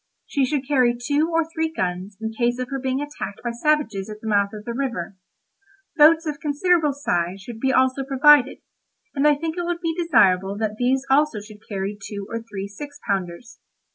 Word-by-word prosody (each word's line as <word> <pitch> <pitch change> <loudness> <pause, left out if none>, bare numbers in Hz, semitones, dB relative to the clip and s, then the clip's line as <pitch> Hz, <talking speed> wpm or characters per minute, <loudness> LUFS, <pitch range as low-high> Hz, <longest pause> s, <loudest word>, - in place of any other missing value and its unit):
She 275 -3 0
should 270 0 -2
carry 250 -4 +3
two 290 +6 0
or 330 -1 +2
three 320 -1 -2
guns 185 - -3
in 220 0 -3
case 240 +1 0
of 255 -1 -4
her 270 - -2
being 265 +1 -1
attacked 290 -8 -6
by 240 - -2
savages 235 -6 0
at 210 0 -8
the 220 - -8
mouth 200 -2 +2
of 210 -1 -9
the 235 - -4
river. 235 -8 -3 0.8
Boats 320 +2 +6
of 295 -2 -3
considerable 305 +1 +2
size 185 -10 -2
should 225 +2 -9
be 265 +2 +1
also 260 +1 +2
provided, 275 0 +4 0.5
and 285 +1 +2
I 295 - +5
think 320 +3 -4
it 350 - -1
would 345 0 -2
be 330 -2 -1
desirable 200 - +3
that 215 -1 -2
these 260 +2 +1
also 285 -5 +3
should 210 0 -14
carry 200 0 -3
two 200 0 -6
or 230 0 -3
three 205 -3 -6
six 285 +8 -10
pounders. 195 +3 -3
255 Hz, 200 wpm, -23 LUFS, 210-295 Hz, 0.8 s, Boats